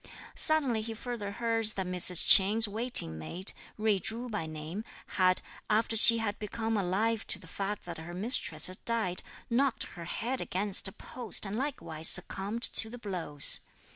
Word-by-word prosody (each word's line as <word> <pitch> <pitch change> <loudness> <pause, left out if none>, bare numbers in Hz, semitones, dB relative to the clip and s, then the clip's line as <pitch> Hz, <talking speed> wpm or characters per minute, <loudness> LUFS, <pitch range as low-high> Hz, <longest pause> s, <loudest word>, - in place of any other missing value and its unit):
Suddenly 275 -8 0
he 225 +1 -6
further 230 -3 -6
heard 230 0 -2
that 190 - -3
Mrs. 180 -1 +1
Ch'in's 215 +4 +6
waiting 210 - +4
maid, 175 - -2 0.2
Jui 215 -3 0
Chu 235 +5 -4
by 210 -7 -4
name, 155 +6 -7 0.2
had, 185 -1 0 0.3
after 220 +1 0
she 230 +1 +8
had 215 -2 -4
become 225 +2 -4
alive 210 +4 -1
to - - -2
the 185 - -16
fact 195 +5 -6
that 170 -2 -8
her 165 +2 -9
mistress 180 -6 +2
had 185 0 0
died, 220 -6 -1 0.3
knocked 255 +1 0
her 170 -1 -9
head 240 +9 -3
against 195 +1 0
a - - -8
post, 235 +2 -4
and 195 +1 -5
likewise 225 - -3
succumbed 205 +5 0
to 225 - +5
the 245 - -9
blows. 175 -10 +2
210 Hz, 170 wpm, -29 LUFS, 180-230 Hz, 0.3 s, she